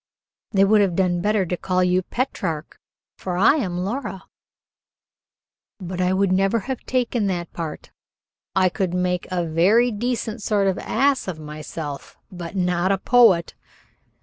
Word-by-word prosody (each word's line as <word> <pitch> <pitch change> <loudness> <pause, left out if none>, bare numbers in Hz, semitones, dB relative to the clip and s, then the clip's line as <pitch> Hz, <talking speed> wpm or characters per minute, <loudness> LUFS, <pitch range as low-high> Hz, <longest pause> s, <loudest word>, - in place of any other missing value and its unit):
"They 195 -2 +4
would 210 +1 +4
have 190 -4 +1
done 175 -2 +1
better 210 0 +1
to 180 - -2
call 185 +1 0
you 180 +1 +2
Petrarch, 180 - -4 0.4
for 180 -2 -3
I 225 +10 +5
am 185 - -2
Laura." 195 0 -4 1.6
"But 185 -1 -4
I 180 0 +2
never 195 +3 +2
could - - -14
have 265 - -4
taken 245 -4 0
that 175 -3 -3
part. 165 -3 -6 0.6
I 190 -1 +4
could 180 -1 -2
make 180 -1 -1
a 180 -2 -1
very 195 +10 +3
decent 230 0 -3
sort 205 -1 +1
of 190 -1 0
ass 275 -4 +1
of 180 -4 -4
myself, 150 -1 -7
but 175 0 -7
not 180 0 +1
a 195 - +2
poet." 225 -10 +4
185 Hz, 150 wpm, -22 LUFS, 175-210 Hz, 1.6 s, I